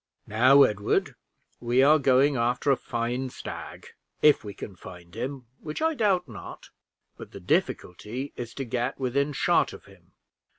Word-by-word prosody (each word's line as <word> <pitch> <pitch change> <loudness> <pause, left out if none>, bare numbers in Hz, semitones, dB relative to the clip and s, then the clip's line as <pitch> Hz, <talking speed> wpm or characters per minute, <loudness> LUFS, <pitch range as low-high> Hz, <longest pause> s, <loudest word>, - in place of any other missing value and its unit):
"Now, 130 +6 +6
Edward, 105 -3 0 0.5
we 120 +2 +2
are 155 +3 +6
going 135 +1 +3
after 125 +3 +1
a - - +5
fine 120 +2 -3
stag, - - -8 0.4
if 150 -3 +5
we 105 - -6
can 100 - -8
find 90 -1 -13
him, 130 +2 -5
which 150 -1 -6
I 320 +1 +1
doubt 205 - +1
not; 110 -5 -10 0.5
but - - -11
the - - -8
difficulty 105 +7 -2
is, 120 -1 -7
to 135 - -4
get 125 +2 -2
within 140 +3 0
shot 140 - +2
of - - -12
him. - - -20
125 Hz, 160 wpm, -26 LUFS, 115-140 Hz, 0.5 s, Now